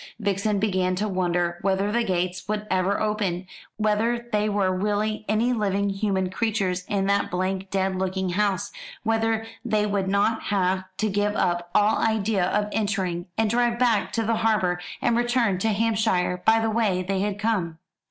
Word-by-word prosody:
Vixen 205 0 0
began 185 -3 +1
to 205 +3 -1
wonder 175 -2 0
whether 195 +1 +1
the 235 +2 +1
gates 185 -2 -2
would 210 0 -2
ever 185 +2 +1
open 205 -4 -1 0.3
whether 225 +3 0
there 210 -1 +1
were 195 -2 +1
really 210 +2 -1
any 225 +4 +2
living 200 -3 0
human 195 -2 -1
creatures 195 -4 -1
in 195 -1 0
that 200 +1 +1
blank 185 +1 -2
dead 190 -1 0
looking 190 0 -1
house 200 +1 0 0.3
whether 225 0 +1 0.2
they 210 -1 +1
would 200 -2 -1
not 200 +3 +1
have 190 -2 0
to 215 - +1
give 205 +1 0
up 175 -2 0
all 210 +1 +4
idea 215 -3 +1
of 205 +2 0
entering, 190 -5 -1
and 220 -1 +2
drive 240 0 +2
back 235 -4 +2
to 225 - 0
the 225 0 +1
harbour, 210 -6 +1 0.2
and 235 - +3
return 240 -5 +1
to 225 - 0
Hampshire 210 -4 +1
by 225 0 +6
the 225 0 0
way 210 -5 +1
they 190 +1 -1
had 205 0 -1
come. 200 -7 -1
205 Hz, 170 wpm, -25 LUFS, 185-220 Hz, 0.3 s, by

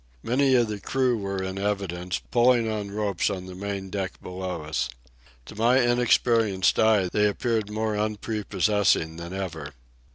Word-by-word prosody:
Many 130 +2 +3
of 120 -2 +3
the 105 -1 -4
crew 130 +2 +1
were 100 -3 -3
in 95 +1 -4
evidence, 95 -3 -2
pulling 120 -1 +4
on 105 -2 -3
ropes 100 -3 -1
on 95 -2 -4
the 95 - -9
main 95 0 -5
deck 95 -2 -4
below 90 -3 -5
us. 75 -4 -2 0.6
To 105 - -11
my 120 +4 +3
inexperienced 115 -5 +2
eye 110 -4 +4
they 105 +3 +2
appeared 110 0 -1
more 110 0 -1
unprepossessing 105 -5 0
than 85 +1 -7
ever. 80 -6 -5
105 Hz, 155 wpm, -25 LUFS, 95-110 Hz, 0.6 s, pulling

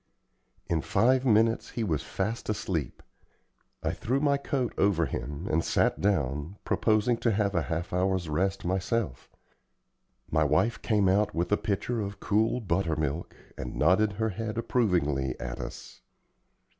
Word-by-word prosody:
In 80 -2 0
five 130 - +2
minutes 115 0 +3
he 115 - -3
was 80 -8 0
fast 110 +5 -3
asleep. 90 - -3 0.8
I - - +1
threw 130 +4 -1
my 140 -1 +3
coat 140 -3 -2
over 95 -5 +2
him, 75 +8 -5
and 80 +2 +1
sat - - +1
down, 80 -3 0
proposing 110 +2 +2
to 115 - +1
have 100 -1 +1
a 90 - +2
half 85 +3 -3
hour's 95 -1 +1
rest 95 +6 -1
myself. 95 - -1 1.0
My 80 0 +3
wife 75 - +1
came 105 -3 +2
out 100 +2 +2
with 85 +3 -1
a - - +6
pitcher 110 +3 -1
of 100 0 -5
cool 110 +6 +1
butter 85 -4 0
milk 75 +1 -3 0.2
and 65 -1 -5
nodded 95 +7 +3
her 110 +2 -1
head 110 +2 -4
approvingly 85 - +1
at - - -5
us. - - -8
95 Hz, 150 wpm, -28 LUFS, 80-110 Hz, 1.0 s, a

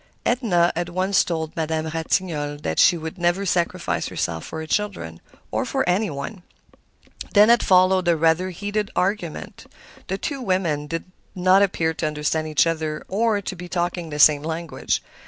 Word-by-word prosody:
Edna 190 -9 +2
had 175 +1 -2
once 185 +2 +2
told 160 -2 -4
Madame 160 -1 -1
Ratignolle 160 -2 -1
that 80 - -1
she 175 - +6
would 160 +3 -7
never 175 +3 +1
sacrifice 175 -2 -1
herself 80 -1 -3
for 160 - -6
her - - -5
children, 155 - -3 0.3
or - - 0
for - - -1
any 190 +4 +1
one. 145 +7 -6 0.9
Then 210 +2 +7
had 235 0 +6
followed 185 -1 +4
a 170 -1 +3
rather 165 +3 +2
heated 205 +3 -3
argument; 180 -3 -3 0.4
the 190 - -2
two 275 +5 -4
women 175 -9 -1
did 165 +2 -3 0.3
not 185 +1 +4
appear 165 -5 +1
to 155 - -2
understand 155 +1 -1
each 155 +1 +3
other 155 -2 -2
or 215 +1 +1
to 190 - -5
be 180 0 -9
talking 175 -1 -2
the 150 - -5
same 150 0 +6
language. 160 +1 -3
175 Hz, 170 wpm, -23 LUFS, 160-190 Hz, 0.9 s, Then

